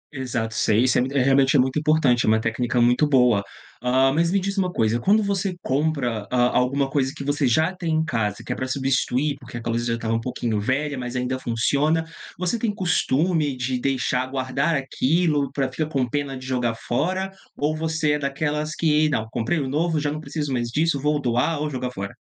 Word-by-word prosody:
Exato, 120 -4 -3
sei. 110 +1 +2
Isso 130 - +3
é - - +3
mu 130 - 0
é 140 -2 +2
realmente 135 +1 +4
é - - +6
muito 130 +3 +2
importante, 150 -6 +3
é - - -2
uma 110 0 +4
técnica 120 +2 -1
muito 125 +5 +4
boa. 125 -7 +4 0.4
Hã, 130 +2 +3
mas 165 +3 +2
me 195 - +2
diz 195 +1 -3
uma 185 -2 0
coisa, 115 -2 +1
quando 210 - +3
você 195 -2 -1
compra 130 -7 -1
a 125 -1 +2
alguma 135 +2 +2
coisa 135 -1 0
que - - -5
você 145 0 +1
já 160 +9 +2
tem 170 -3 -3
em 160 0 +1
casa, 110 -8 -2
que - - -2
é - - -7
pra 130 - -3
substituir, 135 +1 0
porque 125 -3 -9
aquela 115 0 -3
coisa 120 +1 -1
já 115 - 0
estava 115 -1 -2
um 115 - 0
pouquinho 115 -3 -2
velha 140 +5 -1
mas 125 0 -5
ainda 125 +1 -2
funciona, 140 +7 +1 0.3
você 180 +6 -1
tem 215 -2 0
costume 160 -5 +1
de 125 0 -2
deixar 130 -1 0
guardar 135 +4 -1
aquilo 145 +1 +1
pra 135 -1 -1
ficar 150 +4 -3
com 135 -5 0
pena 140 +1 -3
de 130 - -10
jogar 125 -3 -1
fora 185 +12 -1 0.3
ou 150 +2 0
você 160 -1 0
é 150 - +1
daquelas 150 +2 -2
que: 155 -1 +2
"Não, 110 -7 -1
comprei 120 +9 -1
um 140 - -2
novo, 160 +3 0
já 145 0 -1
não 155 - -4
preciso 150 -3 -3
mais 120 -2 -1
disso, 150 +3 +1
vou 150 +1 +1
doar 130 +4 0
ou 150 0 -1
jogar 130 -2 -3
fora."? 100 -3 -6
135 Hz, 220 wpm, -23 LUFS, 125-155 Hz, 0.4 s, é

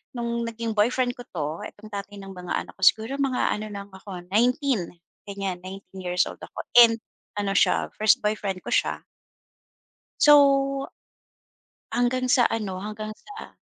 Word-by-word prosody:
no'ng 235 0 -2
naging 230 0 -4
boyfriend 245 +4 +2
ko 245 - -6
'to, 150 -5 -3 0.2
itong 215 +1 -14
tatay 200 0 -6
ng 195 -1 -9
mga 180 -1 -5
anak - - -13
ko, - - -17
siguro 230 +6 +2
mga 270 -2 +1
ano 215 +1 -3
lang 200 -1 -8
ako 190 -2 -9
19 245 - +2 0.4
ganyan, 195 -3 -4
19 190 +1 -10
years 180 0 +1
old - - -8
ako, - - -8 0.2
and 230 -1 +8 0.4
ano 205 -1 -1
siya - - +2
first 215 0 +4
boyfriend 205 -3 -2
ko - - -6
siya. - - +1 1.2
So, 295 - +7 1.6
hanggang 255 +1 0
sa 250 -1 +5
ano, 210 -6 -1
hanggang 215 +2 -6
sa 415 +1 -12
210 Hz, 155 wpm, -25 LUFS, 195-235 Hz, 1.6 s, and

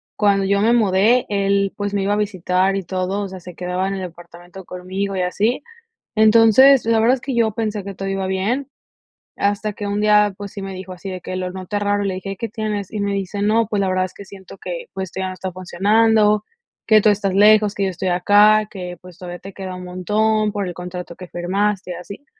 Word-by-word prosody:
cuando 200 -2 +2
yo 200 +1 +2
me 225 +3 +4
mudé, 220 +2 +3
él, 200 -1 +1
pues, 205 0 -3
me 200 - 0
iba 200 +1 +1
a - - +2
visitar 190 -2 0
y 195 - -1
todo, 185 +2 -2
o 200 - -3
sea, 190 0 -8
se 180 0 -11
quedaba 180 +2 -2
en 195 - -2
el 190 - -5
departamento 175 +1 -11
conmigo 190 +2 -4
y 185 - -1
así. 205 +6 0 0.5
Entonces, 225 +4 +6
la 230 0 +2
verdad 235 +3 +4
es 260 - -7
que 270 -3 -3
yo 225 -2 +2
pensé 215 -2 -3
que 200 +1 -7
todo 195 +1 -5
iba 195 0 -2
bien, 215 +9 -1 0.7
hasta 205 +1 -1
que 205 - -6
un 205 +1 -1
día, 210 -1 +4
pues, 200 0 -8
sí 200 - -6
me 195 0 -6
dijo 185 0 -8
así, 185 +1 -7
de 185 -1 -6
que 185 - -6
lo 185 0 -3
noté 190 +2 -4
raro, 205 0 0
y - - -1
le 190 - -2
dije: 195 +1 -6
"¿Qué 230 - -4
tienes?". 210 -3 -4
Y 215 - -4
me 200 0 -1
dice: 200 +1 -3
"No, 220 +1 +2
pues, 205 -1 -1
la 195 - +1
verdad 185 0 +1
es 185 - -11
que 200 - -10
siento 195 -1 -13
que, - - -6
pues, 190 -2 -4
esto - - -7
ya 190 - -1
no 185 - -5
está 185 0 -5
funcionando, 210 +4 +2 0.4
que 215 -1 +6
tú 215 - +4
estás 200 -2 0
lejos, 210 0 +5
que 200 - -1
yo 195 - +1
estoy 185 +1 -4
acá, 205 +4 +4
que, 180 -2 -7
pues, 180 -1 -15
todavía 175 -1 -7
te 195 +1 -10
queda 185 -1 -6
un 180 - -8
montón, 210 +4 0
por 200 -2 -3
el 180 - -5
contrato 180 0 -7
que 185 - -10
firmaste, 185 +2 -1
y - - -3
así". 200 +9 -10
200 Hz, 245 wpm, -20 LUFS, 185-210 Hz, 0.7 s, Entonces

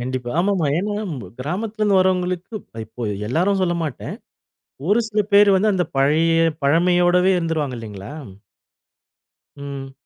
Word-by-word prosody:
கண்டிப்பா. 125 0 -4
ஆமாமா. 190 -5 +1
ஏனா 205 +4 -1 0.2
ம் 150 - -4 0.2
கிராமத்தில 205 - -4
இருந்து 200 -2 +4
வரவங்களுக்கு 180 +1 0
இப் - - -27 0.2
இப்ப 115 0 -6 0.2
எல்லாரும் 190 +8 +1
சொல்லமாட்டேன். 170 -6 -2 0.7
ஒரு 210 +4 +4
சில 215 -1 +1
பேர் 205 0 +7
வந்து 210 +3 +3
அந்த 180 -2 0
பழைய 155 +4 +3 0.3
பழமையோடவே 175 +4 +3
இருந்துருவாங்க. 160 -6 -2
இல்லைங்களா? 105 +1 -8 1.5
ம். 140 -1 -7
175 Hz, 125 wpm, -21 LUFS, 140-190 Hz, 1.5 s, பேர்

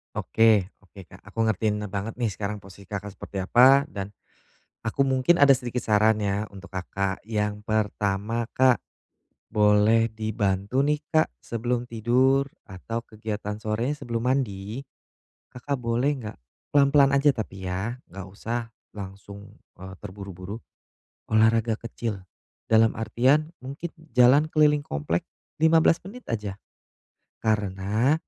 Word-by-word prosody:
Oke, 110 -4 +3 0.2
oke, 95 -1 -14
Kak, - - -16
aku - - -10
ngertiin 105 0 0
ne 105 - -4
banget 105 +4 -5
nih 120 - +1
sekarang 105 0 -4
posisi 100 0 -14
Kakak 100 0 -6
seperti 100 - -6
apa, 135 +5 +6
dan 100 -8 -6 0.7
aku 110 +4 -3
mungkin 135 +5 +3
ada 140 -2 +7
sedikit 125 -1 -4
saran 110 0 +3
ya, 100 0 0
untuk 95 -1 -11
Kakak. 95 +1 -3
Yang 105 -1 -2
pertama 105 +1 -1
Kak, 130 -1 +4 0.8
boleh 105 +2 +4
dibantu 110 +1 -1
nih 150 +1 +1 0.2
Kak, 155 - +4
sebelum 120 +1 -2
tidur 130 +4 +2 0.2
atau 115 +4 -6
kegiatan 105 -1 -5
sorenya 115 +5 -1
sebelum 115 0 -2
mandi, 115 -3 -1 0.7
Kakak 135 +2 -3
boleh 120 +4 +1
enggak 110 -3 -7 0.4
pelan-pelan 140 -1 +5
aja 140 +1 +5
tapi 105 -6 -6
ya, 95 +6 -3 0.2
enggak 95 +1 -8
usah 115 +5 -4 0.3
langsung, 100 0 -10 0.2
eee, 95 +1 -9
terburu-buru, 100 0 -8 0.7
olahraga 110 +1 +3
kecil. 110 -3 -5 0.5
Dalam 110 0 +5
artian, 135 +7 +2
mungkin 140 +6 -6 0.2
jalan 130 +5 +6
keliling 150 -1 +4
komplek 80 - -3 0.3
15 160 +1 +5
menit 245 +5 -10
aja. 105 -3 -3 0.9
Karena, 105 +4 +1
110 Hz, 125 wpm, -25 LUFS, 100-125 Hz, 0.9 s, ada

